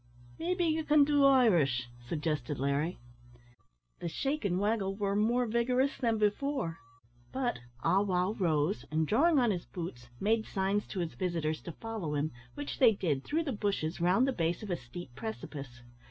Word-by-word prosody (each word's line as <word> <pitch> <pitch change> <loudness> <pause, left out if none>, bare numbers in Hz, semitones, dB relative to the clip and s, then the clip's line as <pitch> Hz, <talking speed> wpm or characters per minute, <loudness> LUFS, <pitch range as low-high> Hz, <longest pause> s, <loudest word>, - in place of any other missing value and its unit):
"Maybe 355 +1 0
ye 320 0 +1
can 300 -1 +5
do 285 -1 +4
Irish?" 175 - +4 0.2
suggested 150 -2 -2
Larry. 140 +5 0 1.0
The 175 - -4
shake 275 - -2
and 185 -3 +1
waggle 205 -2 0
were 200 -1 -1
more 235 +4 +2
vigorous 250 +4 +1
than 230 -3 +1
before 210 - 0 0.5
but 255 - -1 0.2
Ah 195 - +4
wow 185 -1 +1
rose, 165 +1 +1
and, 155 +1 +1
drawing 295 - +4
on 240 -4 +4
his 180 -3 -3
boots, 125 -9 -7
made 220 +2 +1
signs 195 +1 0
to 190 - -3
his 165 -2 -3
visitors 165 -4 -2
to 170 - -7
follow 215 -9 -4
him, 145 +2 0 0.2
which 145 0 -5
they 240 -4 +7
did, 155 -9 -1
through 320 +3 0
the 295 - -2
bushes, 200 -7 -2
round 185 +9 +4
the 270 - +1
base 170 -1 -1
of 205 - -5
a - - +2
steep 130 +1 -9
precipice. 140 - -7
195 Hz, 170 wpm, -31 LUFS, 160-240 Hz, 1.0 s, they